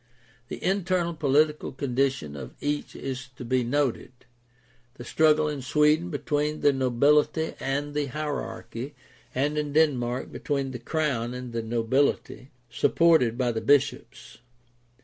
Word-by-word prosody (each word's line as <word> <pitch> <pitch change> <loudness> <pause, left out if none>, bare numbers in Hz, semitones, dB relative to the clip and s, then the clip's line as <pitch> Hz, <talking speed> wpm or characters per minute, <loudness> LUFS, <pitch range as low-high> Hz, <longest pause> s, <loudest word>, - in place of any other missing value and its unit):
The - - -7
internal 185 -2 0
political 150 0 +1
condition 135 - -1
of 70 - -8
each 145 0 -3
is 130 -1 -5
to 125 - -8
be 130 +1 +1
noted 130 0 -1 0.4
— 120 0 -35
the 120 - -9
struggle 155 +1 +3
in 150 -2 -3
Sweden 150 +5 +2
between 150 0 -1
the 145 - +4
nobility 140 +5 +2
and 145 +2 -2
the 145 -1 -1
hierarchy 145 -2 -5 0.4
and 145 +3 0
in 145 -1 -3
Denmark 130 -6 +1
between 140 -2 -2
the 125 - -6
crown 125 -4 -1
and 125 -1 -7
the 115 - -1
nobility, 120 +3 0 0.2
supported 160 -9 +3
by 125 -2 +1
the 110 -1 -3
bishops. 140 -3 0
140 Hz, 135 wpm, -26 LUFS, 125-150 Hz, 0.4 s, the